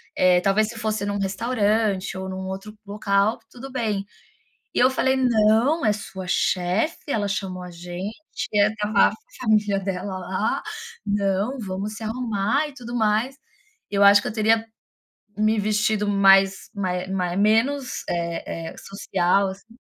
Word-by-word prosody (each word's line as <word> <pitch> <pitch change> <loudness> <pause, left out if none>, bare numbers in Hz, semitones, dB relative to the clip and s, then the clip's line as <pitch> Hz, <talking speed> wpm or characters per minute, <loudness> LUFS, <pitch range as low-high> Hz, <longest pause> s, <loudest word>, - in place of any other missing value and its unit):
eh, 180 -1 +4
talvez 205 +3 +2
se 230 - -8
fosse 215 -2 -2
num 205 0 -2
restaurante 205 -2 0
ou 190 - -5
num 190 0 -5
outro 195 +3 -7
local, 200 +2 +1
tudo 265 +2 -10
bem". 215 -6 -1 0.7
E - - +2
eu 255 +1 +6
falei: 265 0 +1
"Não! 240 +3 +3
É 210 - +4
sua 190 -2 -7
chefe, 185 - 0
ela 205 -5 0
chamou 190 -2 -3
a 180 - -8
gente, 175 +4 -6 0.4
estava 210 +1 +3
a - - -7 0.3
família 210 -4 +2
dela 190 0 -4
lá, 185 +3 -2 0.4
não, 205 +5 0
vamos 200 +1 -4
se 225 - -8
arrumar 230 +4 0
e 290 - -11
tudo 240 -2 -7
mais". 225 +4 +1 0.5
Eu 200 0 +3
acho 200 0 +8
que - - -5
eu - - -4
teria 225 +1 +2 0.7
me 215 0 +2
vestido 210 0 +1
mais 195 -1 +4
mai 185 -2 -2
mai 180 -2 -2
menos, 250 +6 +1
eh 170 -1 -3
eh, - - -13
social, 195 0 0
assim. 205 +4 -12
205 Hz, 150 wpm, -23 LUFS, 195-225 Hz, 0.7 s, acho